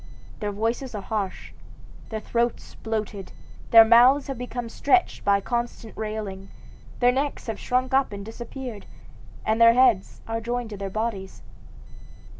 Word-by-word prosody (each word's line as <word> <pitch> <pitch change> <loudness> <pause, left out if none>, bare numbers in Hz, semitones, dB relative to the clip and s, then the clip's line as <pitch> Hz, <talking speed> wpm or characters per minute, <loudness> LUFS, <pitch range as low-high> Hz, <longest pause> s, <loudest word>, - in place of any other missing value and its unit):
Their 210 -1 -2
voices 230 +4 -2
are 205 - -4
harsh, 200 -2 -4 0.6
their 220 - -3
throats 235 +2 -2
bloated, 210 -3 -5 0.4
their 225 -1 +9
mouths 245 +5 +6
have 270 -2 -5
become 245 -1 -5
stretched 290 +9 +1
by 200 0 +3
constant 235 -1 -4
railing, 210 -3 -5 0.5
their 245 0 +5
necks 275 +3 -2
have 225 -3 -4
shrunk 255 +1 -1
up 270 -2 +3
and 200 -1 -7
disappeared, 235 0 -8 0.6
and 220 +1 +1
their 230 0 +8
heads 245 -7 +3
are 225 0 -3
joined 240 0 -3
to 205 - -6
their 195 0 -4
bodies. 205 -2 -4
225 Hz, 145 wpm, -25 LUFS, 210-245 Hz, 0.6 s, their